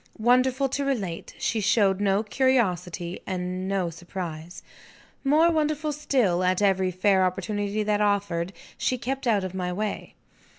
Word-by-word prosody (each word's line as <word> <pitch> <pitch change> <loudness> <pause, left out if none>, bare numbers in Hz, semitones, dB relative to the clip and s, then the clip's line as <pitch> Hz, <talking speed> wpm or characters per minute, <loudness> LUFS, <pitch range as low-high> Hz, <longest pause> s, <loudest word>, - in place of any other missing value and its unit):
Wonderful 255 +4 +3
to 280 +2 -1
relate, 205 -12 -3
she 225 - -1
showed 205 -2 +3
no 200 +1 +2
curiosity 185 -8 0
and 185 0 -3
no 190 -3 -1
surprise. 170 -1 -7 0.6
More 310 +5 +4
wonderful 305 -1 0
still, 255 -12 +1
at 185 0 +2
every 190 -2 +2
fair 190 +1 +2
opportunity 205 +3 -1
that 210 0 +1
offered, 195 -4 0 0.3
she 255 - 0
kept 260 +2 -3
out 210 -4 +2
of 185 -1 -4
my 180 -1 -2
way. 210 +3 -4
200 Hz, 140 wpm, -26 LUFS, 185-250 Hz, 0.6 s, More